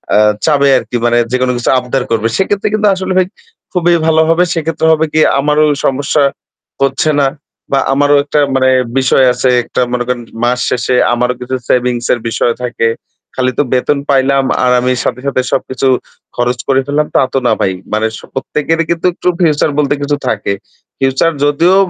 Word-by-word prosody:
আ - - +5 0.3
চাইবে 140 -3 +3
আরকি। 120 0 -3
মানে 120 0 +2
যেকোনো 130 0 +1
কিছু 120 - -2
আবদার 125 +1 -2
করবে। 115 -1 +1
সেক্ষেত্রে 200 +1 0
কিন্তু 215 -1 +2
আসলে 185 0 -3
ভাই 185 - +3 0.5
খুবই 175 -1 +2
ভালো 160 0 +4
হবে। 170 +2 +3
সেক্ষেত্রে 160 0 -1
হবে 160 0 +1
কি 155 - +3 0.2
আমারও 150 +2 +2 0.2
সমস্যা 140 +2 +1 0.6
হচ্ছে 135 +3 +1
না 140 - +3 0.4
বা 135 - +3
আমারও 145 +1 +3
একটা 150 +1 -1 0.2
মানে 130 0 +3 0.3
বিষয় 130 0 +3
আছে 125 +1 0
একটা 120 - -2
মনে 120 0 0
করেন 125 -1 -2 0.2
মাস 125 +1 +1
শেষে 125 +1 0 0.2
আমারও 125 +1 0
কিছু 125 +1 -3
সেভিংস 125 -1 0
এর 120 - -2
বিষয় 120 +1 0
থাকে। 120 -2 0 0.5
খালি 130 -1 0
তো - - +4
বেতন 140 +3 +1
পাইলাম 135 0 +2 0.2
আর 125 - +3
আমি 125 +1 0
সাথে, - - -2
সাথে, 135 -2 +1
সবকিছু 130 0 -1 0.5
খরচ 120 0 -1
করে 135 -1 +3
ফেললাম 150 +1 0
তা - - +5
তো - - +1
না - - +3
ভাই। 95 - +1 0.2
মানে 110 +1 +1
স - - -10
প্রত্যেকেরই 160 +4 -1
কিন্তু 170 0 -2
একটু 180 - -5
ফিউচার 155 -3 +2
বলতে 145 -1 +1
কিছু 145 +1 0
থাকে। 105 -3 -1 0.5
ফিউচার 135 +5 +1
যদিও 165 +6 +3
135 Hz, 180 wpm, -13 LUFS, 125-150 Hz, 0.6 s, আ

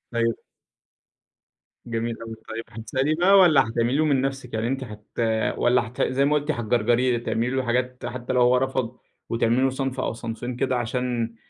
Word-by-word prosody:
أيوه. 115 -1 +1 1.5
جميل 115 0 -3
أوي 115 0 -7
طيب، 115 +1 -4 0.2
هتسأليه 130 +7 0
بقى، 180 +4 +4
والّا 155 -9 +6
هتعملي 120 +4 0
له 155 - +3
من 140 -3 +2
نفْسِك 135 -3 -4
يعني 110 +1 -1
أنتِ 135 +1 -2
هت 105 -3 -11 0.5
والّا 120 -2 +2
هت 125 - -6
زي 135 +2 +2
ما 150 +1 +2
قُلتِ 150 +1 0
هتجَرْجَريه 120 0 +1
تعملي 115 +1 -1
له 130 0 -1
حاجات 125 +1 -1
حتّى 120 +1 -4
لو 125 - +3
هو 125 +1 +5
رفض، 130 -2 -1 0.3
وتعملي 115 +2 +2
له 135 - +3
صنف 130 0 -3
أو 115 - -1
صنفين 120 +2 -5
كده 130 +1 0
عشان، 120 -1 -2
125 Hz, 175 wpm, -24 LUFS, 115-130 Hz, 1.5 s, والّا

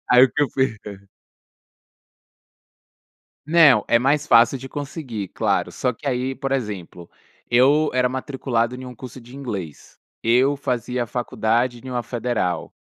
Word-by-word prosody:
Aí 125 0 +7
o 130 - 0
que 145 - 0
eu - - +3
fi 130 -4 0 2.7
Não, 150 -9 +6
é 115 - +4
mais 145 +4 +1
fácil 115 +1 +5
de 135 +1 -9
conseguir, 135 - -5
claro, - - -1
só 125 - -1
que, 130 - -13
aí, 130 0 -1
por 135 +1 -4
exemplo, 100 -9 -4 0.4
eu 140 +6 +4
era 125 0 +2
matriculado 130 -2 -2
em 130 0 -8
um 125 - -9
curso 130 +2 -10
de 125 +3 -13
inglês. 100 - -7 0.2
Eu 130 +5 +3
fazia 125 -2 -2
faculdade 120 +1 -1
em - - -6
uma 125 -1 -2
federal. 115 -7 -2
125 Hz, 145 wpm, -22 LUFS, 115-135 Hz, 2.7 s, Aí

